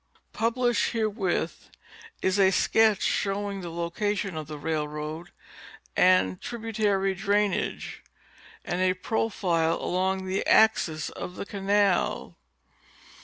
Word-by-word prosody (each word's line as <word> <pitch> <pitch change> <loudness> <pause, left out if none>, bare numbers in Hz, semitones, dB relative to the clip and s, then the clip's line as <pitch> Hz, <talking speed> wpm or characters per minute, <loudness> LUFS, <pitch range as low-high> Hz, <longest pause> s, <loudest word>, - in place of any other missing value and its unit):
Published 235 -2 +1
herewith 210 -7 -2 0.5
is 190 +2 +1
a 190 -1 +6
sketch 215 +2 +3
showing 200 0 -1
the 175 - -6
location 185 +3 -2
of 155 -2 -5
the 155 -1 -7
railroad, 150 +1 -4 0.7
canal 185 0 +5
and 95 - -10
tributary 215 -4 -1
drainage, 205 +1 -1 0.6
and 175 +1 -2
a 185 0 +2
profile 185 -5 0
along 190 +1 -1
the 190 +1 -1
axis 165 -8 +3
of 180 - -7
the - - -5
canal. 200 -1 0
190 Hz, 110 wpm, -27 LUFS, 175-210 Hz, 0.7 s, a